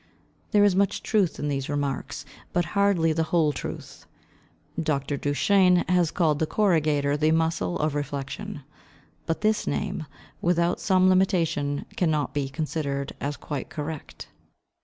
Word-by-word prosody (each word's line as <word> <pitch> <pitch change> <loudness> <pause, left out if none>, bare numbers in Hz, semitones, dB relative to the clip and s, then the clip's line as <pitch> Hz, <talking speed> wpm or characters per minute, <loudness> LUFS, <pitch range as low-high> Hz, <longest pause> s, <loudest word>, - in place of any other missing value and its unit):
There 205 -2 +4
is 200 -3 +4
much 195 0 +1
truth 200 -6 +1
in 150 - -3
these 135 -2 -2
remarks, 145 -2 -3 0.3
but 175 0 +2
hardly 200 -5 +3
the 160 +1 0
whole 160 -4 +3
truth. - - -7 0.7
Dr. 145 -2 -1
Duchenne 180 +6 +3
has 180 -2 +3
called 155 -5 +1
the 160 - +1
corrugator 155 -8 +2
the 155 +1 +2
muscle 160 - +1
of 155 -1 0
reflection; 145 0 -5 0.6
but 165 - -1
this 215 0 +1
name, 190 -6 -2 0.3
without 170 0 +1
some 185 -1 +3
limitation, 165 -6 +1
cannot 155 -7 +1
be 140 -2 -1
considered 140 -2 -3
as 145 +1 -2
quite 145 -3 -5
correct. 155 -1 -6
160 Hz, 140 wpm, -26 LUFS, 145-180 Hz, 0.7 s, There